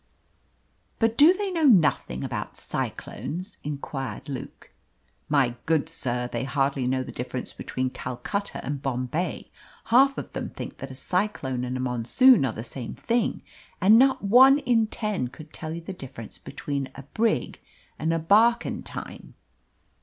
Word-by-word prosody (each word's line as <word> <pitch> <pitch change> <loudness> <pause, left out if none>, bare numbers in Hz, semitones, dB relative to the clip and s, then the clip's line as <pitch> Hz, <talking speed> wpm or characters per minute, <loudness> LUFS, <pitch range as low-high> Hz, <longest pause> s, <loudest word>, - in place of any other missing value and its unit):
"But 225 -1 +2
do 300 +6 +8
they 395 +1 -2
know 330 -3 +1
nothing 165 - +3
about - - -4
cyclones?" 185 +5 -5
inquired 140 -2 -5
Luke. 140 -2 -8 0.6
"My 135 -5 +3
good 160 -1 +2
sir, 125 -6 -2
they 120 0 -3
hardly 135 -1 0
know 130 0 0
the - - -8
difference 125 +1 -5
between 130 0 -3
Calcutta 130 +14 -4
and 140 -1 -3
Bombay. 135 +6 -3 0.4
Half 270 +2 +6
of - - -6
them - - -4
think - - -8
that 135 - -7
a 130 - -9
cyclone 135 -6 -1
and 125 +1 -3
a - - -5
monsoon 130 - +4
are - - -1
the 110 - -6
same 120 0 -6
thing, 235 -1 -1 0.4
and 215 +4 +7
not 265 -3 +4
one 260 +7 +7
in 240 -5 +2
ten 210 - -2
could 155 +5 -13
tell 160 -1 -5
you 170 +1 -5
the 180 +3 -7
difference 130 - -9
between 140 -2 -4
a 140 - -9
brig 220 - -1 0.4
and 160 +1 0
a 165 - +2
barquentine." 220 +8 +1
155 Hz, 155 wpm, -26 LUFS, -, 0.6 s, do